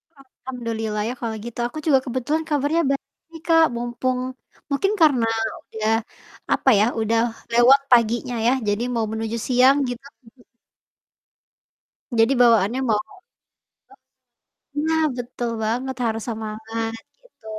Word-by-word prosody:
Alhamdulillah 230 Hz, -5 st, -5 dB
ya, -, -, -3 dB
kalau 225 Hz, -2 st, -3 dB
gitu, 235 Hz, 0 st, -8 dB
aku 240 Hz, -, -10 dB
juga 275 Hz, -4 st, +5 dB
kebetulan 260 Hz, +6 st, -1 dB
kabarnya 295 Hz, +3 st, +1 dB
baik, 320 Hz, +4 st, -6 dB
Kak. 325 Hz, -1 st, +6 dB
Mumpung 240 Hz, +2 st, -2 dB, 0.5 s
mungkin 390 Hz, +9 st, +1 dB
karena 265 Hz, -8 st, +4 dB, 0.4 s
udah, 220 Hz, 0 st, -1 dB, 0.6 s
apa -, -, +2 dB
ya, 210 Hz, -, +5 dB
udah 225 Hz, +1 st, +1 dB, 0.3 s
lewat 245 Hz, +4 st, +6 dB
paginya 240 Hz, 0 st, +3 dB
ya, 245 Hz, -, +4 dB
jadi 205 Hz, +3 st, 0 dB
mau 225 Hz, -1 st, +1 dB
menuju 220 Hz, +1 st, -3 dB
siang, 255 Hz, +2 st, +5 dB
gitu. 245 Hz, +2 st, -7 dB, 0.2 s
Mhm. 240 Hz, +2 st, -20 dB, 1.8 s
Jadi 225 Hz, +4 st, +5 dB
bawaannya 230 Hz, 0 st, +4 dB
mau 215 Hz, -2 st, +2 dB
heeh? 405 Hz, -, -17 dB, 1.7 s
Nah, 320 Hz, 0 st, +2 dB
betul 245 Hz, 0 st, -4 dB
banget, 250 Hz, +4 st, -2 dB
harus 225 Hz, -1 st, -2 dB
semangat, 225 Hz, 0 st, -4 dB, 0.3 s
gitu. -, -, -26 dB
240 Hz, 125 wpm, -22 LUFS, 225-270 Hz, 1.8 s, Kak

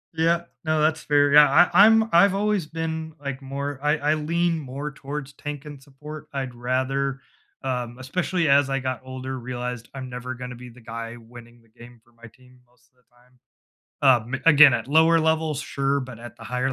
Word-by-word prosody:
Yeah 170 Hz, +1 st, +1 dB, 0.2 s
no, 155 Hz, -1 st, 0 dB
that's 155 Hz, +1 st, +1 dB
fair, 145 Hz, -1 st, +2 dB
yeah, 150 Hz, 0 st, +8 dB
I 175 Hz, -, +6 dB
I 200 Hz, -, +8 dB
I'm 225 Hz, 0 st, +4 dB
I've 195 Hz, +3 st, +5 dB
always 205 Hz, -5 st, 0 dB
been, 160 Hz, 0 st, -5 dB
like, 140 Hz, -2 st, -6 dB
more 140 Hz, +1 st, -5 dB
I 150 Hz, +1 st, +1 dB
I 150 Hz, +1 st, +1 dB
lean 165 Hz, +2 st, 0 dB
more 140 Hz, +1 st, -6 dB
towards 140 Hz, 0 st, -7 dB
tank 145 Hz, +1 st, -7 dB
and 145 Hz, -2 st, -10 dB
support; 150 Hz, +3 st, -11 dB
I'd 135 Hz, -3 st, -4 dB
rather, 130 Hz, +2 st, -2 dB, 0.4 s
um, 125 Hz, -2 st, -3 dB
especially 170 Hz, +5 st, -1 dB
as 140 Hz, 0 st, +4 dB
I 135 Hz, -, 0 dB
got 130 Hz, -2 st, -4 dB
older, 130 Hz, 0 st, -6 dB
realized 125 Hz, -1 st, -6 dB
I'm 130 Hz, -1 st, -7 dB
never 125 Hz, +1 st, -6 dB
gonna 125 Hz, 0 st, -7 dB
be 125 Hz, +1 st, -11 dB
the 120 Hz, +1 st, -17 dB
guy 115 Hz, +1 st, -7 dB
winning 120 Hz, 0 st, -15 dB
the 115 Hz, -, -28 dB
game 120 Hz, 0 st, -14 dB
for 120 Hz, -, -28 dB
my 115 Hz, 0 st, -14 dB
team 125 Hz, +1 st, -22 dB
most 120 Hz, 0 st, -32 dB
of 130 Hz, -, -43 dB
the 125 Hz, -, -36 dB
time. 125 Hz, +1 st, -28 dB, 1.0 s
Um, -, -, -4 dB
again, 150 Hz, -4 st, +7 dB
at 120 Hz, +1 st, -3 dB
lower 160 Hz, +2 st, +4 dB
levels, 160 Hz, -2 st, 0 dB
sure, 140 Hz, 0 st, -1 dB
but 130 Hz, -3 st, -9 dB
at 120 Hz, +1 st, -10 dB
the 115 Hz, -, -14 dB
higher 125 Hz, +3 st, -2 dB
135 Hz, 200 wpm, -24 LUFS, 125-155 Hz, 1.0 s, yeah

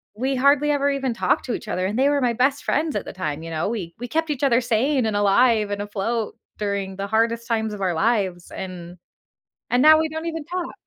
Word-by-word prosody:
we 260 Hz, +5 st, -1 dB
hardly 280 Hz, +3 st, +3 dB
ever 285 Hz, -1 st, +1 dB
even 270 Hz, -3 st, -1 dB
talked -, -, 0 dB
to 245 Hz, -, -2 dB
each 225 Hz, -, -6 dB
other, 185 Hz, -3 st, -1 dB
and 210 Hz, +4 st, -3 dB
they 270 Hz, +2 st, +4 dB
were 285 Hz, -1 st, +1 dB
my 245 Hz, -2 st, +2 dB
best 270 Hz, +4 st, +1 dB
friends 310 Hz, +1 st, 0 dB
at -, -, -2 dB
the -, -, -7 dB
time, 155 Hz, -5 st, -4 dB
you 165 Hz, -, -7 dB
know? 160 Hz, +2 st, -2 dB
We 185 Hz, -7 st, -5 dB
we 245 Hz, -, -5 dB
kept 320 Hz, +6 st, -1 dB
each 290 Hz, -2 st, -3 dB
other 255 Hz, -3 st, +4 dB
sane 245 Hz, +3 st, +1 dB
and 215 Hz, -, -1 dB
alive 210 Hz, +1 st, +3 dB
and 205 Hz, 0 st, -2 dB
afloat 210 Hz, +2 st, -3 dB, 0.2 s
during 200 Hz, -2 st, -3 dB
the 200 Hz, 0 st, -3 dB
hardest 230 Hz, +2 st, 0 dB
times 220 Hz, -2 st, -1 dB
of 205 Hz, -, -7 dB
our 180 Hz, -3 st, 0 dB
lives, 190 Hz, -2 st, 0 dB
and 180 Hz, -2 st, -7 dB, 0.7 s
and 245 Hz, -, +3 dB
now 310 Hz, +2 st, +8 dB
we 320 Hz, -, +1 dB
don't 320 Hz, +2 st, -5 dB
even 325 Hz, -2 st, -4 dB
talk. 355 Hz, +1 st, -4 dB
230 Hz, 240 wpm, -23 LUFS, 200-275 Hz, 0.7 s, now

